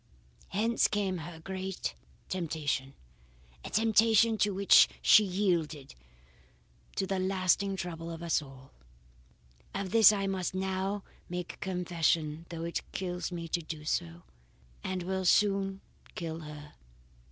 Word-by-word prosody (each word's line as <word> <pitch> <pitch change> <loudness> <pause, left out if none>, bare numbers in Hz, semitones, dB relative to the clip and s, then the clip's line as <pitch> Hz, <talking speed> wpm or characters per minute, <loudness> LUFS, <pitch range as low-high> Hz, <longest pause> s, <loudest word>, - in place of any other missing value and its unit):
"Hence 225 +5 +2
came 195 -3 -1
her 165 +1 -8
great 190 +2 -4 0.3
temptation, 150 -6 -2 0.7
a - - -6
temptation 225 +1 +4
to 205 - +3
which 195 +1 +6
she 215 - +7
yielded, 170 -8 -1 1.0
to 195 - 0
the 190 0 -1
lasting 190 +1 +1
trouble 170 -2 -5
of 165 0 -7
us 165 -2 +1
all. 135 -2 -14 1.0
Of 195 -2 -3
this 225 -3 +8
I 200 -2 -1
must 190 -2 -2
now 190 +1 -2 0.3
make 180 0 -5
confession 170 -3 -1
though 165 -1 -5
it 170 0 -2
kills 180 -1 -3
me 170 -1 -5
to 170 - 0
do 155 -1 -7
so, 85 - -2 0.6
and 185 -1 -3
will 190 +1 -2
soon 195 +1 +2 0.3
kill 165 -2 -4
her. 150 -1 -10
180 Hz, 130 wpm, -30 LUFS, 165-195 Hz, 1.0 s, this